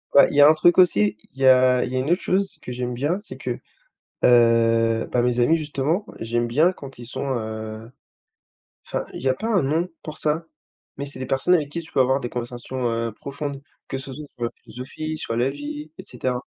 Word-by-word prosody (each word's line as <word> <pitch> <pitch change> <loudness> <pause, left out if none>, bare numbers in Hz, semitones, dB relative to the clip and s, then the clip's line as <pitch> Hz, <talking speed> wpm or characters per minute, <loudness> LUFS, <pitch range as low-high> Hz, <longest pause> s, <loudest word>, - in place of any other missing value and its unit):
Ouais. 140 - +9
Il - - -5
y 145 - +6
a 145 - +10
un - - +7
truc 175 +2 +4
aussi, 175 - +5 0.2
i - - -24
il 135 - -9
y - - +4
a 130 -1 +6
il 125 - -6
y - - -1
a 130 - +1
une 135 - -2
autre 180 - +2
chose 195 +1 0
que - - -7
j'aime 125 0 -3
bien, 145 +10 0
c'est 220 - -9
que, - - -4 0.7
heu 115 -1 +4
bah, 125 - +3
mes 125 0 +1
amis 160 +7 +4
justement, 155 +6 -1
j'aime 120 +1 0
bien 155 +10 +3
quand 140 -7 -11
ils 120 - -8
sont, 135 - -4
heu 110 0 -6 1.0
enfin, - - -3
il - - -7
y 135 - 0
a 130 - +3
pas 220 +10 -4
un 190 -7 +3
nom 160 +6 0 0.2
pour 155 -1 -7
ça? 155 +2 -1 0.5
Mais 140 - -4
c'est 140 -2 -3
des 130 - -4
personnes 135 +8 +2
avec 150 -5 +1
qui 170 +3 -3
tu 160 - -5
peux - - +2
avoir 130 +2 +3
des 120 - -4
conversations, 120 +1 -4
heu, 115 -1 -2
profondes, 140 +3 -6 0.3
que - - -3
ce 135 0 -6
soit 150 +3 -7
sur 120 - -2
la 115 - -1
philosophie, 155 +5 -6
sur 115 - -3
la 125 +3 +2
vie 145 +2 -7
et - - -7
cetera. 125 0 -3
130 Hz, 240 wpm, -23 LUFS, 120-150 Hz, 1.0 s, a